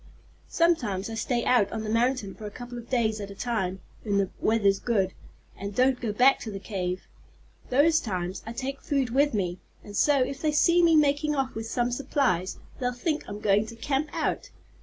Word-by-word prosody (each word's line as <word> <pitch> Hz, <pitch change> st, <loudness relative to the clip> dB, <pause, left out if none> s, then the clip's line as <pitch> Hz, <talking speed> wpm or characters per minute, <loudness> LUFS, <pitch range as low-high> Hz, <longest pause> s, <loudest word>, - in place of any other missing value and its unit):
Sometimes 230 Hz, -, +1 dB
I -, -, -4 dB
stay 235 Hz, +1 st, -1 dB
out 215 Hz, -6 st, +3 dB
on 220 Hz, -1 st, -3 dB
the -, -, -5 dB
mountain 235 Hz, -3 st, +1 dB
for 215 Hz, -, -8 dB
a -, -, -5 dB
couple 245 Hz, +3 st, -9 dB
of 235 Hz, -, -12 dB
days 220 Hz, -4 st, +1 dB
at 200 Hz, -, -6 dB
a 200 Hz, -, -9 dB
time, 190 Hz, -5 st, -2 dB, 0.2 s
when 205 Hz, -3 st, 0 dB
the 195 Hz, -2 st, +1 dB
weather's 200 Hz, -3 st, +2 dB
good, 195 Hz, -6 st, 0 dB, 0.4 s
and 200 Hz, 0 st, -6 dB
don't 255 Hz, 0 st, +3 dB
go 230 Hz, -3 st, -1 dB
back 255 Hz, +6 st, +5 dB
to 225 Hz, -, -6 dB
the 200 Hz, -, -5 dB
cave. 185 Hz, -3 st, -3 dB, 0.7 s
Those 315 Hz, +5 st, +4 dB
times 185 Hz, -3 st, -3 dB
I 225 Hz, -, -4 dB
take 270 Hz, +3 st, -4 dB
food 270 Hz, -5 st, 0 dB
with 280 Hz, 0 st, +2 dB
me, 180 Hz, -3 st, -1 dB, 0.2 s
and 205 Hz, -, -10 dB
so 290 Hz, +6 st, +4 dB
if 270 Hz, +2 st, -5 dB
they 305 Hz, -1 st, +1 dB
see 340 Hz, +3 st, +4 dB
me 335 Hz, -1 st, +5 dB
making 300 Hz, 0 st, +3 dB
off 265 Hz, -2 st, -1 dB
with 225 Hz, 0 st, -5 dB
some 240 Hz, +1 st, 0 dB
supplies 245 Hz, -, 0 dB, 0.2 s
they'll 250 Hz, -1 st, -1 dB
think 300 Hz, +5 st, -2 dB
I'm 205 Hz, 0 st, -6 dB
going 210 Hz, +1 st, +2 dB
to 230 Hz, -, -9 dB
camp 275 Hz, +5 st, -1 dB
out." -, -, -2 dB
235 Hz, 205 wpm, -27 LUFS, 200-270 Hz, 0.7 s, back